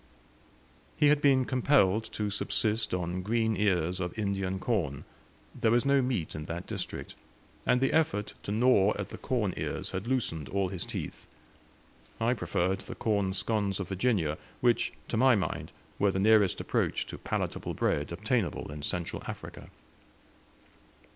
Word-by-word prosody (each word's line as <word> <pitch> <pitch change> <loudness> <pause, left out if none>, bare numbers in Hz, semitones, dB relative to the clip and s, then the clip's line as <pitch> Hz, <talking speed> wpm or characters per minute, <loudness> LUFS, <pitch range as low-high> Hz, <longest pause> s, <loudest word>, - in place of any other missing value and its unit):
He 150 -1 +5
had 150 0 +4
been 135 -3 +4
compelled 120 -6 +3
to 105 -1 -2
subsist 110 +2 0
on 90 0 -2
green 110 +2 +1
ears 90 -3 +1
of 90 +2 -4
Indian 95 -2 -1
corn; 95 - -1 0.5
there 115 - +1
was 120 +3 +3
no 140 0 +4
meat 125 -11 -1
in 75 - -5
that 85 +3 -5
district; - - -4 0.5
and 125 - +4
the 135 +1 +1
effort 155 -10 +1
to - - -5
gnaw 105 -2 +4
at 100 - -4
the - - -8
corn 115 -8 0
ears - - -3
had 95 +4 -4
loosened 95 - -1
all 95 -1 0
his 90 -3 -3
teeth. - - -6 0.9
I - - +2
preferred 95 +2 0
the - - -8
corn 100 -4 0
scones 100 -2 0
of 95 - -4
Virginia, 95 -6 +1 0.2
which, 120 -1 +2 0.2
to 115 - -2
my 130 +1 +6
mind, 95 - -2 0.3
were 100 - +4
the 95 - -1
nearest 105 -1 +4
approach - - 0
to - - -8
palatable - - -3
bread 75 +1 0
obtainable 105 - -1
in 75 0 -7
Central 85 +3 -2
Africa. - - -8
100 Hz, 155 wpm, -30 LUFS, 90-120 Hz, 0.9 s, my